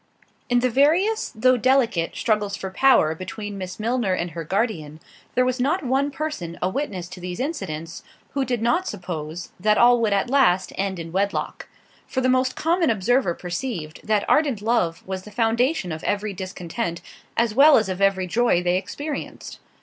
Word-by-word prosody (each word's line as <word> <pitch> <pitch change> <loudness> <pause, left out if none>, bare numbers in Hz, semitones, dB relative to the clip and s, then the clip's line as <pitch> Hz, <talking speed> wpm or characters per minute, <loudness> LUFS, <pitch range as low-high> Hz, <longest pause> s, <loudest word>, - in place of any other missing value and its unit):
In 245 0 +3
the 255 - +2
various, 350 - +2
though 255 +3 +4
delicate, 240 -9 +2
struggles 210 -2 0
for 190 -1 -6
power 190 -9 +4
between 200 +4 -6
Miss 185 +1 -6
Milner 230 -3 0
and 175 -1 -3
her 165 +1 -5
guardian, 165 -5 -2 0.4
there 250 - +3
was 255 0 -1
not 295 +6 0
one 270 +3 +1
person 275 - -5
a 180 - 0
witness 190 -7 -3
to 185 - -9
these 180 0 -6
incidents, 165 - -4 0.3
who 275 - 0
did 245 -3 -2
not 340 +11 +1
suppose, 175 -3 -6
that 210 +3 +3
all 240 0 +5
would 220 -2 +2
at 200 +4 +1
last 240 -9 +3
end 195 -1 -2
in 165 -1 -7
wedlock—for 200 +6 -4
the 255 0 +2
most 255 0 +2
common 335 0 +1
observer 225 -2 +1
perceived, 175 -3 -5
that 210 -1 +1
ardent 285 -8 +2
love 215 -8 0
was 190 0 -4
the 210 - -12
foundation 230 - +1
of 160 +1 -6
every 205 0 -1
discontent, 185 0 -4 0.4
as 230 -2 +2
well 285 +5 +7
as 220 - +1
of 185 0 -4
every 195 -1 +3
joy 200 -2 +2
they 180 +1 +2
experienced. 285 +10 -6
215 Hz, 175 wpm, -23 LUFS, 180-255 Hz, 0.4 s, well